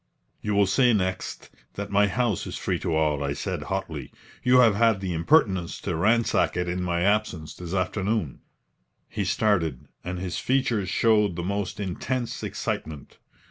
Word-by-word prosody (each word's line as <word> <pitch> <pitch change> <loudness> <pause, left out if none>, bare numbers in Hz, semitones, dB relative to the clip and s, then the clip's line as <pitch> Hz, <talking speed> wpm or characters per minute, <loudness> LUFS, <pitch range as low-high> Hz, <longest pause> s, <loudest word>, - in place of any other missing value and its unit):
"You 105 -1 -1
will 100 0 +5
say 120 +6 +3
next 95 -3 -2 0.2
that - - -5
my 100 0 +4
house 110 0 -1
is - - -5
free - - -1
to 80 - -1
all," 75 -2 +1
I 70 0 -1
said, 70 - -4
hotly. - - -4 0.3
"You 125 0 +4
have 120 -4 +6
had 110 -1 +3
the 95 -2 -3
impertience 95 - +2
to 90 - -2
ransack 110 +4 +2
it 90 0 -1
in 90 +1 -2
my 85 -1 -1
absence 100 -5 0
this 90 +1 -6
afternoon." 95 - -1 0.7
He 105 - -3
started, 90 - +1 0.2
and 90 +1 -4
his 90 0 -3
features 120 -7 0
showed 105 -3 +3
the 85 - -3
most 100 +1 -3
intense 115 +6 -3
excitement. 75 -3 -5
95 Hz, 165 wpm, -26 LUFS, 90-110 Hz, 0.7 s, have